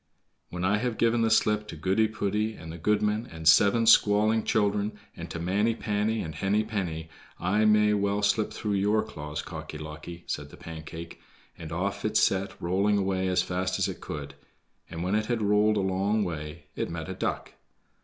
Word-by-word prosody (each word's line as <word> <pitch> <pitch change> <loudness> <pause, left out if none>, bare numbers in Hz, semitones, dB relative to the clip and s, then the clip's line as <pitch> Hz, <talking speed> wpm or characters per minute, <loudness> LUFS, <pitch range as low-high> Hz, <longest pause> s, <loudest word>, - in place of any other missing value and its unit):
"When 90 +1 -3
I 105 +3 +3
have 120 -1 -2
given 115 0 +2
the 115 - +3
slip 105 -1 +2
to - - -7
Goody 95 +7 +2
poody, 105 0 -1
and 80 - -8
the 85 - -8
goodman, 105 +5 +1
and 80 -1 -5
seven 105 +8 +6
squalling 110 0 +5
children, 105 0 0 0.2
and 85 0 -7
to 80 - -5
Manny 100 +7 +1
panny, 105 0 -1
and 80 - -5
Henny 95 +6 +1
penny, 85 -7 -4 0.3
I 105 +5 +2
may 105 0 +5
well 100 0 0
slip 105 +1 +2
through 105 -1 -3
your 105 +2 +2
claws, 75 -7 -6
Cocky 75 - -7
locky," 75 +3 -8
said 75 0 -4
the - - -14
Pancake, 80 +1 -9 0.3
and 80 -1 -9
off 90 +4 -2
it 110 - +1
set 95 0 +1
rolling 100 +4 +1
away 95 -1 0
as 90 -1 +2
fast 90 +1 -1
as - - +1
it - - -6
could; 70 -2 -6 0.6
and 80 +1 -5
when 95 +2 -1
it 110 0 +1
had 120 -3 0
rolled 105 +1 +3
a - - +2
long 95 +3 +1
way 80 -2 -5
it - - -2
met 80 -1 -5
a 95 - -4
duck. 95 - -3
100 Hz, 195 wpm, -27 LUFS, 85-105 Hz, 0.6 s, seven